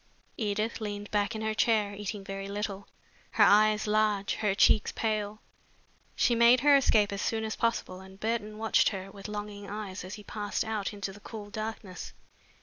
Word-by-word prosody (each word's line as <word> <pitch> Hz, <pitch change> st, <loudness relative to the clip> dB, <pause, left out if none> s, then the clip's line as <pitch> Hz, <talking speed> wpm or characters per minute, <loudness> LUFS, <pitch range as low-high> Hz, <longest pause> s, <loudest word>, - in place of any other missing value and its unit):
Edith 215 Hz, +1 st, -1 dB
leaned 205 Hz, -1 st, -5 dB
back 210 Hz, +2 st, 0 dB
in 220 Hz, -, -4 dB
her 220 Hz, 0 st, 0 dB
chair, 215 Hz, -2 st, +2 dB
eating 205 Hz, 0 st, -5 dB
very 195 Hz, 0 st, -5 dB
little, 200 Hz, -1 st, -4 dB, 0.5 s
her -, -, +5 dB
eyes 215 Hz, +1 st, +5 dB
large, 210 Hz, -2 st, +1 dB
her 210 Hz, -3 st, 0 dB
cheeks 210 Hz, +1 st, +4 dB
pale. 215 Hz, -1 st, -2 dB, 0.7 s
She 240 Hz, -, +3 dB
made 235 Hz, +1 st, +6 dB
her 290 Hz, +1 st, +6 dB
escape 215 Hz, -7 st, +4 dB
as 200 Hz, -, -3 dB
soon 220 Hz, -1 st, -1 dB
as 220 Hz, 0 st, -3 dB
possible 230 Hz, -5 st, -1 dB
and 190 Hz, 0 st, -13 dB
Burton 215 Hz, -1 st, -2 dB
watched 220 Hz, 0 st, +3 dB
her 195 Hz, -1 st, -6 dB
with 200 Hz, 0 st, -9 dB
longing 205 Hz, -1 st, -6 dB
eyes 205 Hz, -3 st, -5 dB
as 185 Hz, +3 st, -7 dB
he 210 Hz, -, -11 dB
passed 205 Hz, -1 st, -3 dB
out 215 Hz, -2 st, -2 dB
into 200 Hz, -2 st, -5 dB
the 205 Hz, -, -13 dB
cool 205 Hz, -1 st, -9 dB
darkness. 215 Hz, -4 st, -6 dB
210 Hz, 180 wpm, -29 LUFS, 200-220 Hz, 0.7 s, made